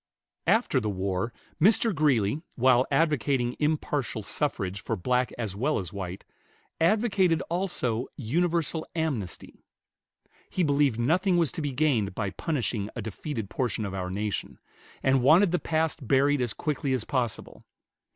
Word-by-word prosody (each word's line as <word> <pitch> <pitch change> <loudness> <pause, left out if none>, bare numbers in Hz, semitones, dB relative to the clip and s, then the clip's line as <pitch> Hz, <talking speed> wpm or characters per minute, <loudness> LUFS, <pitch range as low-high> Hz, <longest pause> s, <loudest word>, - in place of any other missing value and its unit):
After - - +3
the 110 - -2
war 95 +2 -2 0.3
Mr. 220 +4 +5
Greeley, 140 - +2
while 130 0 +4
advocating 140 -6 +1
"impartial 150 -6 -1
suffrage" 100 -7 -2
for 115 - -2
black 125 +6 0
as 110 -5 -3
well 135 +9 0
as 95 -3 -5
white, 95 -2 -6 0.5
advocated 190 -2 +3
also 135 -10 -1
"universal 165 +5 0
amnesty." 140 - -3 0.9
He 185 - 0
believed 140 -5 +2
nothing 175 - +2
was 165 -5 +2
to - - -5
be 145 -2 -2
gained 125 -9 +1
by 100 -3 -2
punishing 120 -9 -2
a 115 - -3
defeated 110 0 -5
portion 115 -2 -1
of 100 - -5
our 90 -1 -3
nation, 105 +2 -3 0.5
and 135 -1 +3
wanted 165 +8 +6
the 180 - +1
past 155 -4 -1
buried 140 +2 +3
as 120 -3 -1
quickly 145 -3 -1
as 125 -4 0
possible. 120 -5 -3
130 Hz, 140 wpm, -27 LUFS, 110-155 Hz, 0.9 s, wanted